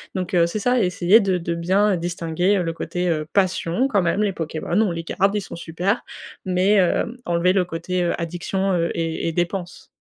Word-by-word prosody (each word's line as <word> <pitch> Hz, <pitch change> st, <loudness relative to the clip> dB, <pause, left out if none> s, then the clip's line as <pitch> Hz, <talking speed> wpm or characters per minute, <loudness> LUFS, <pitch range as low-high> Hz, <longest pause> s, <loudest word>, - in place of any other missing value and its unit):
donc, 185 Hz, -1 st, -3 dB
heu, 170 Hz, -1 st, +4 dB
c'est 190 Hz, -, -4 dB
ça, 245 Hz, +4 st, +2 dB
essayer 180 Hz, +3 st, +4 dB
de 190 Hz, -3 st, +1 dB
de 170 Hz, 0 st, -3 dB
bien, 190 Hz, +5 st, +2 dB
heu, -, -, 0 dB
distinguer, 175 Hz, +3 st, 0 dB
heu, 180 Hz, -, 0 dB
le 165 Hz, -1 st, -2 dB
côté, 180 Hz, +2 st, -3 dB
heu, 155 Hz, -3 st, -1 dB
passion, 190 Hz, +4 st, +1 dB
quand 205 Hz, -7 st, +2 dB
même, 175 Hz, +4 st, +1 dB
les 200 Hz, -3 st, 0 dB
Pokémons 165 Hz, +4 st, -1 dB
ont 210 Hz, -, +1 dB
les 165 Hz, 0 st, -4 dB
gardent, 195 Hz, +4 st, 0 dB
ils -, -, +1 dB
sont -, -, -8 dB
supers. 175 Hz, +6 st, -2 dB, 0.4 s
Mais, 185 Hz, +2 st, +2 dB
hem, 195 Hz, +5 st, +1 dB
enlever 175 Hz, +1 st, +2 dB
le 190 Hz, -1 st, +3 dB
côté, 180 Hz, +1 st, -3 dB
heu, 170 Hz, -, -1 dB
addiction, 180 Hz, +3 st, -2 dB
heu 170 Hz, -1 st, +1 dB
et 165 Hz, -1 st, -2 dB
et 165 Hz, -, 0 dB
dépense. 175 Hz, +1 st, -3 dB
180 Hz, 215 wpm, -22 LUFS, 170-195 Hz, 0.4 s, heu